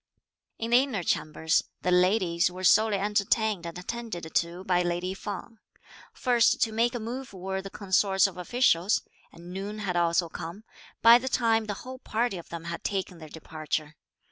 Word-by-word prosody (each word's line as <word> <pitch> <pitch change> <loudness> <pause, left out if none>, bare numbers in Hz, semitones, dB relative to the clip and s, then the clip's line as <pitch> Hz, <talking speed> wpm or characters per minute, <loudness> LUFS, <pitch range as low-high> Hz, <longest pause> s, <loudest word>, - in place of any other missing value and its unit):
In 230 +1 -4
the 240 - +7
inner 250 -10 -2
Chambers, 160 +1 +1 0.2
the 180 - +1
ladies 180 -1 +3
were 185 +1 -8
solely 215 +2 +5
entertained 205 -1 0
and 170 - -7
attended 180 -4 -6
to 170 +2 -1
by 180 -1 +2
lady 175 +1 -1
Feng. 205 +3 -7 0.5
First 240 -3 +2
to 225 - 0
make 235 +2 +1
a - - -2
move 245 +2 -6
were 190 +1 -4
the 195 - -8
consorts 195 0 +2
of 195 - -1
officials; 185 -1 +2 0.3
and 175 +1 -12
noon 200 +3 -5
had 200 -4 -3
also 170 0 +2
come, 170 +5 -8 0.4
by 235 +1 +9
the 260 +1 -3
time 225 -3 +2
the 205 -1 -3
whole 255 0 -8
party 225 -5 -1
of 170 - -13
them 170 -1 -6
had 170 0 -6
taken 190 -3 -3
their 155 -1 -10
departure. 155 -1 -4
190 Hz, 175 wpm, -27 LUFS, 175-225 Hz, 0.5 s, by